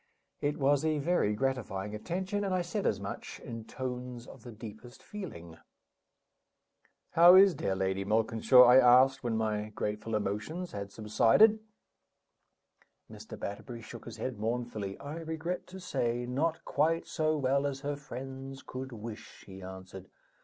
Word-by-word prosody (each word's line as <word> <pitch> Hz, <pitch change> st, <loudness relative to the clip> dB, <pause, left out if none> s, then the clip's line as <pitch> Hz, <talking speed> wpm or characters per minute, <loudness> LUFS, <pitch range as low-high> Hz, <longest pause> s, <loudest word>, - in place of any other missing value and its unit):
It 145 Hz, +1 st, -1 dB
was 140 Hz, 0 st, +2 dB
a 155 Hz, -1 st, +1 dB
very 145 Hz, -9 st, +1 dB
gratifying 105 Hz, -6 st, -2 dB
attention, 190 Hz, -, -3 dB
and 190 Hz, -2 st, 0 dB
I 180 Hz, -, 0 dB
said 195 Hz, +4 st, -2 dB
as -, -, 0 dB
much, -, -, -7 dB
in 115 Hz, -1 st, -8 dB
tones 125 Hz, -1 st, -6 dB
of 130 Hz, -, -13 dB
the 120 Hz, -, -10 dB
deepest 110 Hz, +2 st, -11 dB
feeling. 85 Hz, -, -8 dB, 1.5 s
"How 175 Hz, +2 st, +8 dB
is 195 Hz, 0 st, +8 dB
dear 95 Hz, -9 st, -2 dB
Lady 95 Hz, 0 st, -1 dB
Malkinshaw?" 110 Hz, +4 st, +5 dB
I 125 Hz, +1 st, +7 dB
asked, 130 Hz, +2 st, +6 dB
when 115 Hz, -2 st, 0 dB
my 110 Hz, -1 st, -1 dB
grateful 105 Hz, +1 st, -3 dB
emotions 105 Hz, -, -3 dB
had 100 Hz, -1 st, -6 dB
subsided. 115 Hz, -, +4 dB, 1.5 s
Mr. -, -, -10 dB
Batterbury 115 Hz, +3 st, -6 dB
shook 110 Hz, -, -10 dB
his 115 Hz, -1 st, -8 dB
head 115 Hz, 0 st, -4 dB
mournfully. 110 Hz, -3 st, -3 dB
"I 145 Hz, +3 st, -7 dB
regret 165 Hz, +2 st, -4 dB
to 190 Hz, +1 st, -10 dB
say, 120 Hz, -9 st, -1 dB
not 155 Hz, +7 st, -1 dB
quite 160 Hz, +3 st, +1 dB
so 155 Hz, 0 st, 0 dB
well 140 Hz, 0 st, +1 dB
as 135 Hz, -1 st, -5 dB
her 145 Hz, 0 st, -2 dB
friends 135 Hz, -1 st, -8 dB
could 130 Hz, +1 st, -7 dB
wish," 115 Hz, -1 st, -9 dB
he 95 Hz, -1 st, -11 dB
answered. 95 Hz, 0 st, -10 dB
125 Hz, 150 wpm, -31 LUFS, 105-150 Hz, 1.5 s, How